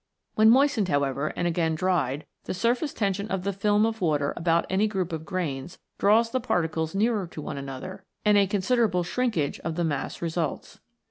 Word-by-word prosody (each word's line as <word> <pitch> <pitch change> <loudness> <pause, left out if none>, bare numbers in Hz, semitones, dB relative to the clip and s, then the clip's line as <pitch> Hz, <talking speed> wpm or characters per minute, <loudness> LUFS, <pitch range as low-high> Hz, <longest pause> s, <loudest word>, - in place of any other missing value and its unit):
When 215 +1 +5
moistened, 250 -5 +4
however, 140 0 0
and 175 - 0
again 165 -1 0
dried, 155 -5 0 0.2
the - - -3
surface 240 - 0
tension 200 -1 -1
of 190 -3 -2
the 200 +1 -1
film 205 +2 +2
of 225 -1 -2
water 150 -4 +1
about 170 0 +1
any 195 +3 +2
group 190 -5 -2
of 160 0 -5
grains, 170 -6 -3 0.2
draws 225 +3 +4
the 260 - +1
particles 160 -7 -1
nearer 210 -2 +1
to 165 - -10
one 150 - -5
another, 135 +6 -7 0.2
and 210 0 +5
a 200 -1 +5
considerable 205 -1 +1
shrinkage 205 - -1
of 165 -1 -4
the 175 - 0
mass 145 -4 -2
results. 165 -3 -3
180 Hz, 185 wpm, -26 LUFS, 160-210 Hz, 0.2 s, When